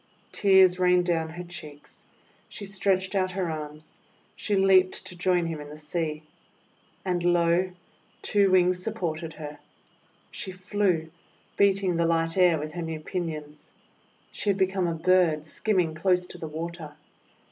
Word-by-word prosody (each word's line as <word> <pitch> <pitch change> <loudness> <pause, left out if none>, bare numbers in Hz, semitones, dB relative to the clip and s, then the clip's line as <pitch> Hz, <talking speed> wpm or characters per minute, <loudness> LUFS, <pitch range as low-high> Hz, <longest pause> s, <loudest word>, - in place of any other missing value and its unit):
Tears 190 -2 +5
rained 180 -1 +4
down 165 -2 0
her 175 +2 -7
cheeks. 155 -5 -11 0.4
She 205 - -7
stretched 190 -1 0
out 185 -2 0
her 180 -3 -1
arms. 155 0 -8 0.4
She 205 - -1
leaped 190 -1 +3
to 180 - -8
join 175 0 +1
him 160 -2 -4
in 145 - -9
the 150 - -10
sea. 155 0 -3 0.8
And, 180 -2 -1
lo! 175 +1 +3 0.5
two 200 -2 +3
wings 180 -1 +3
supported 170 -7 -3
her. 150 -1 -8 0.7
She 195 - -6
flew, 185 -3 -1 0.4
beating 195 -3 +2
the 170 0 +2
light 165 0 +1
air 180 -3 +5
with 155 +1 -5
her 175 - -4
new 160 -1 -4
pinions. 155 -3 -6 0.6
She 210 - -3
had 195 - +2
become 190 -1 +1
a 165 - -1
bird 165 -2 +2
skimming 180 -1 0
close 180 +2 +1
to 180 - -11
the 160 - -5
water. 160 -1 -6
175 Hz, 150 wpm, -26 LUFS, 160-185 Hz, 0.8 s, Tears